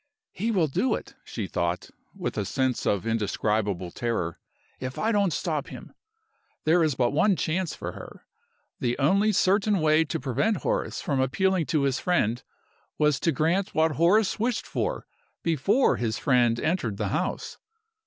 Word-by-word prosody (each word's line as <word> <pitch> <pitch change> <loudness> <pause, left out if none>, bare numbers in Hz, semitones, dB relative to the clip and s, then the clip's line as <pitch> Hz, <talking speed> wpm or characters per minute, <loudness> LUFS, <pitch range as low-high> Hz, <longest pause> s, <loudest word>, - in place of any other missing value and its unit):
"He 220 +5 -2
will 190 -7 +2
do 220 - +1
it," - - -8
she 110 - -5
thought, 85 -1 -2 0.2
with - - -4
a 105 - -1
sense 130 +5 -1
of 100 +1 +1
indescribable 105 -4 -1
terror, 100 -8 -2 0.4
"if 130 0 -5
I 225 - +1
don't 200 -4 +2
stop 150 -2 -2
him!" - - -10 0.7
There 165 +3 +4
is 155 -4 +1
but 120 -2 +1
one 190 +7 +3
chance 170 0 -1
for - - -5
her. - - -11 0.5
The 120 -1 -1
only 195 +10 +3
certain 200 +1 +2
way 155 -1 +4
to 145 - -3
prevent 140 - 0
Horace - - -1
from 140 -2 0
appealing 180 +6 +1
to 150 -3 +1
his 135 -2 +1
friend 125 - +1 0.6
was 150 -2 +2
to 165 - +1
grant 165 +7 0
what 160 0 +3
Horace 185 - +3
wished 235 +1 0
for - - -3 0.4
before 170 - +2
his 110 -2 -1
friend 120 -4 +2
entered 145 - -1
the - - -1
house. - - -3
150 Hz, 165 wpm, -26 LUFS, 120-185 Hz, 0.7 s, There